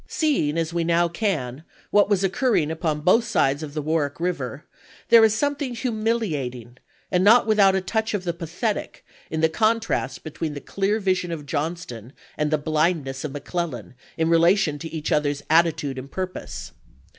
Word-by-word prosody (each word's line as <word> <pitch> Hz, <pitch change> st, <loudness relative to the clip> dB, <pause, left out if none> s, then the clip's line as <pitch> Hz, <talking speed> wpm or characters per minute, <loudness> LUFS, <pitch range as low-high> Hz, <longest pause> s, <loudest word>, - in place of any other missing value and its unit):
Seeing, 265 Hz, -, 0 dB
as 165 Hz, 0 st, -1 dB
we 170 Hz, -1 st, 0 dB
now 170 Hz, +1 st, +2 dB
can, 160 Hz, -, -2 dB, 0.3 s
what 205 Hz, 0 st, +4 dB
was 200 Hz, -2 st, +2 dB
occurring 190 Hz, -, +1 dB
upon 160 Hz, -2 st, -2 dB
both 205 Hz, +9 st, +4 dB
sides 140 Hz, -10 st, +1 dB
of 150 Hz, -1 st, -7 dB
the 150 Hz, -, -2 dB
"Warwick 150 Hz, -2 st, -1 dB
River, 145 Hz, -6 st, -3 dB, 0.4 s
there 230 Hz, -1 st, +8 dB
is 220 Hz, -1 st, +4 dB
something 285 Hz, 0 st, -1 dB
humilia 220 Hz, -, -1 dB
ting 120 Hz, 0 st, -12 dB, 0.3 s
and 180 Hz, 0 st, +2 dB
not 225 Hz, +5 st, +6 dB
without 205 Hz, -3 st, +4 dB
a 190 Hz, -, +1 dB
touch 220 Hz, +3 st, -1 dB
of 195 Hz, -, -3 dB
the 175 Hz, -2 st, -2 dB
pathetic 175 Hz, +6 st, -4 dB, 0.2 s
in 160 Hz, 0 st, -2 dB
the 160 Hz, -, +5 dB
contrast 220 Hz, +7 st, 0 dB
between 155 Hz, -1 st, -4 dB
the -, -, -4 dB
clear 200 Hz, +7 st, -1 dB
vision 185 Hz, -3 st, 0 dB
of 155 Hz, -3 st, -5 dB
Johnston 145 Hz, -6 st, -4 dB, 0.2 s
and 150 Hz, 0 st, 0 dB
the 155 Hz, -, +2 dB
bUndness 155 Hz, -3 st, 0 dB
of 150 Hz, -, -4 dB
McClellan, 145 Hz, -, -4 dB, 0.2 s
in 160 Hz, -1 st, +1 dB
relation 165 Hz, -2 st, +3 dB
to 165 Hz, -, -6 dB
each 160 Hz, -1 st, -4 dB
other's 145 Hz, -1 st, 0 dB
attitude 160 Hz, -5 st, +2 dB
and 130 Hz, +2 st, -9 dB
purpose. 185 Hz, +2 st, -6 dB
165 Hz, 175 wpm, -23 LUFS, 150-200 Hz, 0.4 s, there